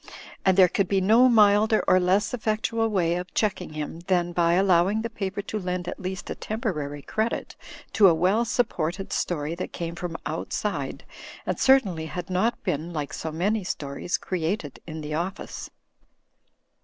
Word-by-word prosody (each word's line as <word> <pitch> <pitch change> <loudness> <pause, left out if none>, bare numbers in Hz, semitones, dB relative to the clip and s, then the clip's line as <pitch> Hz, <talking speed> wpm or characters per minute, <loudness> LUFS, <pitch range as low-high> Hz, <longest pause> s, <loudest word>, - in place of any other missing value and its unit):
And 190 -1 +3
there 185 -2 +8
could 195 +2 0
be 195 +1 +2
no 225 +7 +5
milder 215 -1 +5
or 185 0 +6
less 190 +5 +2
ef 245 - -4
fectual 225 +1 +1
way 175 -5 +1
of 180 +1 -6
checking 190 -6 -1
him 155 +2 -5
than 175 -2 +2
by 170 -1 +2
allowing 190 +3 +3
the 230 - -4
paper 200 -2 -4
to 215 - -4
lend 180 -2 -3
at 180 - -5
least 190 -1 -5
a - - 0
temporary 150 - -4
credit 220 - -2 0.4
to 205 - +7
a 175 - +6
well 190 +8 +2
supported 195 -7 -1
story 155 -2 -1
that 170 - -5
came 170 -1 -4
from 170 -1 -5
outside, - - -3 0.4
and - - -2
certainly 195 -12 +3
had 180 +2 -6
not 225 +6 0
been 155 +4 -2
(like 150 -4 -4
so 160 - -4
many 200 +6 0
stories) 145 0 -3
created 165 -4 -3
in 160 -1 -6
the 150 0 -5
office. 175 +5 -4
185 Hz, 170 wpm, -25 LUFS, 170-210 Hz, 0.4 s, there